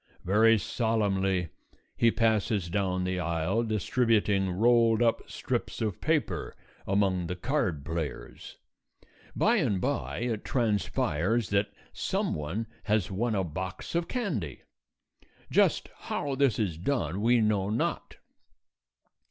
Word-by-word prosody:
Very 110 +4 +5
solemnly 95 -5 0 0.5
he 115 - +4
passes 110 -5 +1
down 95 -2 0
the 90 0 -1
aisle 85 +5 0
distributing 110 -2 +1
rolled 115 +3 +4
up 115 -1 0
strips - - -3
of 105 -5 -2
paper 145 - -1 0.3
among 95 -3 +1
the 90 - -3
card 95 - -1
players. 80 -2 -5 0.8
By 235 +3 +3
and 120 - +1
by 140 +1 -2
it 115 -3 -2
transpires 105 - 0
that 100 +1 +1 0.2
some - - -1
one 80 +10 -3 0.2
has 105 -3 +1
won 110 +4 0
a 95 - +1
box 90 +3 -5
of 170 0 0
candy. 140 - -3 0.9
Just - - +3
how 140 -1 -3
this 135 -2 +2
is 90 -8 -1
done 95 - -1
we 120 +2 +4
know 105 -3 +1
not. 110 +3 -2
105 Hz, 120 wpm, -28 LUFS, 90-115 Hz, 0.9 s, Very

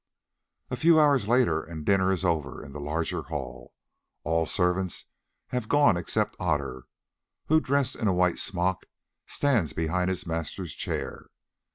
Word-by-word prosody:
A - - 0
few 160 +5 +5
hours 140 -8 +4
later 115 -10 +3
and 80 -2 -8
dinner 95 -1 +3
is 95 -1 -1
over 80 -5 -1
in 70 - -11
the 75 - -7
larger 80 +3 -2
hall. 65 -6 -7 0.5
All 80 +1 +1
the - - -5
servants 90 -1 0 0.4
have 125 -3 -3
gone 145 -8 +5
except 85 -1 -1
Otter, 70 -7 -2 0.6
who 155 +1 +5
dressed 140 -2 +1
in 110 - -1
a 95 - +3
white 90 -1 +2
smock 90 0 0 0.4
stands 120 - +1
behind 90 +3 0
his 90 -1 -2
master's 80 0 -4
chair. - - -4
90 Hz, 155 wpm, -27 LUFS, 80-110 Hz, 0.6 s, few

